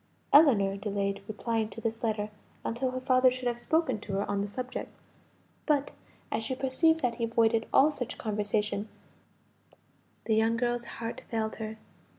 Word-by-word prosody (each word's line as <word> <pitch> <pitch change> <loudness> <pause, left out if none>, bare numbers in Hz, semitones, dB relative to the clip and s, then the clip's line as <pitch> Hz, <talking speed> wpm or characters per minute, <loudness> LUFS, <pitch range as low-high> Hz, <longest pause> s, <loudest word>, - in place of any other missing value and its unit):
Ellinor 220 -10 +6
delayed 200 -1 -2
replying 220 0 -1
to 225 - -9
this 225 0 -3
letter 215 -2 -1 0.3
until 245 +3 -1
her 255 0 -3
father 255 0 +4
should 255 0 -3
have 240 -1 -1
spoken 310 -3 +1
to 200 - -7
her 200 +1 0
on 200 -1 0
the 200 - -2
subject. 250 +5 -5 0.8
But 285 -2 +2 0.4
as - - 0
she 240 +4 -3
perceived 320 +5 +2
that 250 -3 +1
he - - +3
avoided 230 0 +2
all 290 +3 +6
such 250 -5 -4
conversation, 210 -1 -1 1.4
the 220 - +2
young 225 +1 +3
girl's 240 0 0
heart 230 0 -5
failed 220 -1 -2
her. 220 0 -5
230 Hz, 160 wpm, -29 LUFS, 215-255 Hz, 1.4 s, Ellinor